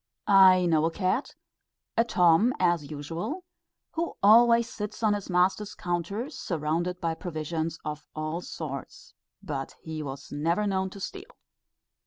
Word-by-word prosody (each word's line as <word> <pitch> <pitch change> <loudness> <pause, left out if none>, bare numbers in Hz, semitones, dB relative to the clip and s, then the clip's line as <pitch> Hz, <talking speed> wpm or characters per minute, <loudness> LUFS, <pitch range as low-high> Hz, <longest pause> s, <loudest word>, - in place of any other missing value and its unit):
I 190 -2 +7
know 160 -2 +3
a - - +2
cat 190 - -1 0.6
a 230 - +4
Tom, 180 +2 +4
as 175 -5 +1
usual 165 - -5 0.5
who 335 +1 -3
always 235 +2 +6
sits 210 +1 -6
on 215 -1 +4
his 205 -1 -4
master's 190 +3 +1
counter, 175 - -2
surrounded 170 - -2
by 165 -2 -1
provisions 160 -1 -3
of 150 0 -4
all 155 +2 -3
sorts, - - -7 0.3
but 140 -7 -5
he 160 -1 -5
was 140 -1 -7
never 165 +8 0
known 190 -1 0
to 200 - -11
steal. 390 - -8
180 Hz, 140 wpm, -27 LUFS, 160-210 Hz, 0.6 s, I